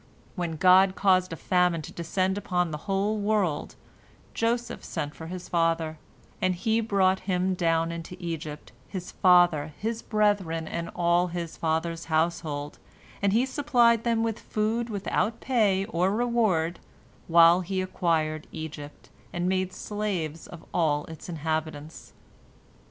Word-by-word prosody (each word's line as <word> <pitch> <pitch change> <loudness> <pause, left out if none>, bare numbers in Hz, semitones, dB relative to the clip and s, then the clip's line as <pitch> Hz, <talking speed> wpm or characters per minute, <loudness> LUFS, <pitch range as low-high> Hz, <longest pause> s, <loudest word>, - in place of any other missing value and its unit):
When 175 -4 -3
God 185 +3 +5
caused 185 -2 +3
a - - -3
famine 180 -2 +1
to - - -8
descend 185 +3 -1
upon 180 -4 -1
the 150 - -4
whole 200 +2 +1
world, 205 -7 0 0.6
Joseph 235 +1 -1
sent 145 0 -4
for 160 - -9
his 180 +1 -7
father, 165 -2 0 0.4
and 185 0 +2
he 225 +5 +1
brought 190 -3 +2
him 185 +1 +1
down 165 -2 +1
into 170 +2 -7
Egypt 165 -3 -6 0.2
his 185 -3 -6
father, 175 -5 +4
his 225 +1 -3
brethren, 200 -7 0
and 170 +1 -4
all 175 +1 +2
his 170 -1 -5
father's 165 +1 -1
household, 160 -3 -1 0.4
and 200 -1 +2
he 235 +5 +3
supplied 245 -5 +3
them 230 -1 +1
with 225 0 -2
food 225 +2 -1
without 210 +2 -1
pay 205 -7 +2
or 180 0 +1
reward, 210 -7 +1 0.5
while 170 +1 +6
he 190 +1 -3
acquired 160 -4 -1
Egypt, 150 -2 -8 0.2
and 175 0 -2
made 185 0 0
slaves 185 -8 -4
of 170 - -11
all 150 -3 +1
its 160 +2 -10
inhabitants. 155 -1 -4
180 Hz, 140 wpm, -27 LUFS, 165-200 Hz, 0.6 s, while